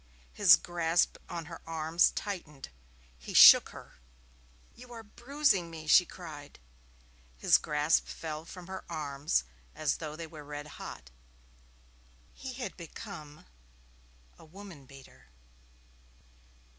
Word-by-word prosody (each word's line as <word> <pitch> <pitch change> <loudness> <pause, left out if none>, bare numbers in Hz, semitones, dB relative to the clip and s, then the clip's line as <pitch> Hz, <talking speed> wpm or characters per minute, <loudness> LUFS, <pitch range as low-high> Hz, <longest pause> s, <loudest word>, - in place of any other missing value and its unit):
His 195 -2 +7
grasp 170 -1 0
on 170 -1 -5
her 165 0 -10
arms 165 +1 +2
tightened. 160 -9 -6 0.5
He - - -9
shook - - +9
her. - - -14 0.7
'You 245 0 -15
are 230 -1 -9
bruising 240 - 0
me,' 160 -1 -9
she 175 +4 +5
cried. 150 -5 -11 0.8
His - - +4
grasp 150 +1 +1
fell 155 -1 -6
from 175 +2 -11
her 190 +1 -7
arms 145 - -1 0.3
as 150 -2 -1
though 155 -2 -7
they 165 +1 -7
were 155 -2 -11
red 145 0 -7 0.2
hot. - - -9 1.2
He 265 -1 -8
had 250 0 -6
become 170 -3 -10 0.9
a - - -15
woman 170 -4 -13
beater. 135 - -16
165 Hz, 120 wpm, -30 LUFS, 150-190 Hz, 1.2 s, shook